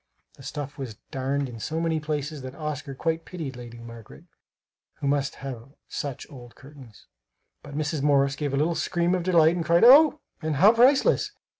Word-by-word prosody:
The - - -17
stuff 145 +1 -7
was 125 -6 -6 0.2
darned 135 +1 -2
in 120 -2 -9
so 160 +8 -3
many 165 -1 0
places 150 -1 -4
that 130 +1 -8
Oscar 150 -3 -5
quite 165 +3 -2
pitied 160 -8 -7
Lady 120 -1 -10
Margaret 115 - -12 0.7
who - - -7
must 140 0 0
have 135 -1 -8
such 140 -3 -5
old 120 -4 -12
curtains; 135 -5 -15 0.6
but 140 - -11
Mrs. 155 -1 -2
Morris 140 -1 +2
gave 145 -2 -3
a 135 - -1
little 155 +4 +1
scream 175 +1 0
of 185 - 0
delight 170 -2 +4
and 175 - -2
cried 170 +2 +3
"Oh!" 300 +5 +7 0.2
and 155 -2 -2
"How 200 +10 +6
priceless!" 255 +4 +3
145 Hz, 180 wpm, -25 LUFS, 135-165 Hz, 0.7 s, Oh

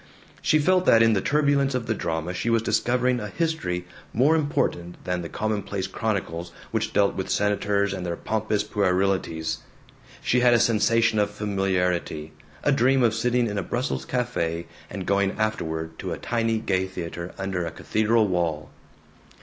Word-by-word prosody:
She 155 - +3
felt 185 +4 +2
that 115 0 +7
in 115 0 +5
the 95 - +1
turbulence 140 -1 +2
of 125 -2 -2
the 110 - 0
drama 80 -3 -3
she 115 - -2
was 115 -1 +2
discovering 125 +2 +1
a 105 - -4
history 105 - -2 0.3
more 140 +8 +4
important 90 - -1
than 90 -1 -2
the 85 - -6
commonplace 100 -3 -2
chronicles 90 -6 -3 0.2
which - - -1
dealt 100 -1 +3
with 95 - -4
senators 100 -1 +1
and 95 - -4
their 85 -1 -2
pompous 110 +2 -1
puerilities. 95 -4 0 0.6
She 125 - +3
had 120 -1 +5
a - - +4
sensation 115 0 +3
of 105 - +2
familiarity; 95 -6 -1 0.3
a 145 - +3
dream 135 -1 +3
of 115 -2 +3
sitting 120 +1 +1
in 105 -3 -2
a - - 0
Brussels 125 +6 -2
cafe 85 -10 -1 0.2
and 95 -1 -5
going 100 0 +2
afterward 80 -7 -2
to - - -3
a - - -5
tiny 115 -1 0
gay 95 -3 0
theater 85 -1 -6
under 95 -2 -2
a 85 - -2
cathedral 110 +6 +1
wall. 85 -4 -1
105 Hz, 165 wpm, -25 LUFS, 90-115 Hz, 0.6 s, that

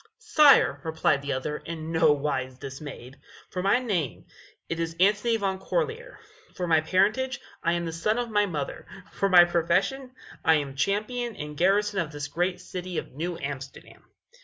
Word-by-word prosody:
"Sire," 300 -2 +5
replied 160 -3 +1
the 140 0 -2
other, 140 +3 -3
in 165 -1 -7
no 160 -2 +4
wise 135 -3 -2
dismayed, 135 -1 -9 0.3
"for 180 - -3
my 200 +5 +3
name, 190 - -2 0.4
it 165 - -3
is 165 0 -2
Antony 210 +4 +3
Van 195 -3 -2
Corlear; 480 - -3 0.4
for 180 - -2
my 160 -2 +3
parentage, 215 +10 +1 0.2
I 170 - +1
am 170 0 -1
the 165 - -4
son 210 +7 0
of 240 -2 -2
my 205 -1 +3
mother; 150 -6 -5 0.2
for 195 - 0
my 175 -2 +8
profession, 185 +10 0 0.3
I 160 -1 +5
am 140 -3 -2
champion 215 - -1
and 150 0 -7
garrison 200 +4 +2
of 165 -3 -2
this 145 -1 -5
great 175 +4 -1
city 180 -1 -6
of - - -4
New 165 +5 -4
Amsterdam." 135 -2 -8
175 Hz, 170 wpm, -26 LUFS, 150-205 Hz, 0.4 s, my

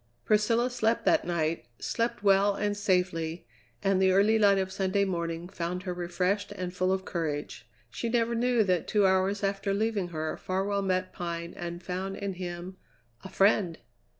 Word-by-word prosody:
Priscilla 230 +3 +2
slept 230 -1 0
that - - +3
night, 165 -5 -1
slept 230 - -2
well 200 0 +4
and 205 0 -1
safely, 180 -4 0 0.4
and 195 -1 +2
the 190 0 +5
early 205 +4 +4
light 200 -2 +5
of 190 0 -1
Sunday 195 +1 +1
morning 170 -2 -3
found 180 0 -4
her 180 -2 -3
refreshed 180 +4 -1
and 180 -3 -5
full 185 +1 +1
of 190 0 -1
courage. 145 -7 -4 0.2
She 230 - -3
never 235 0 +1
knew 240 -1 +2
that 185 -3 0
two 205 -2 +3
hours 190 +2 +2
after 195 0 0
leaving 210 -3 0
her 155 -2 -3
Farwell 195 +2 -1
met 185 -1 -1
Pine 170 -1 -4
and 175 0 -6
found 190 +2 -4
in 200 -1 -3
him 180 0 -6 0.5
a 190 - -8
friend! 195 -3 +3
190 Hz, 170 wpm, -29 LUFS, 175-205 Hz, 0.5 s, the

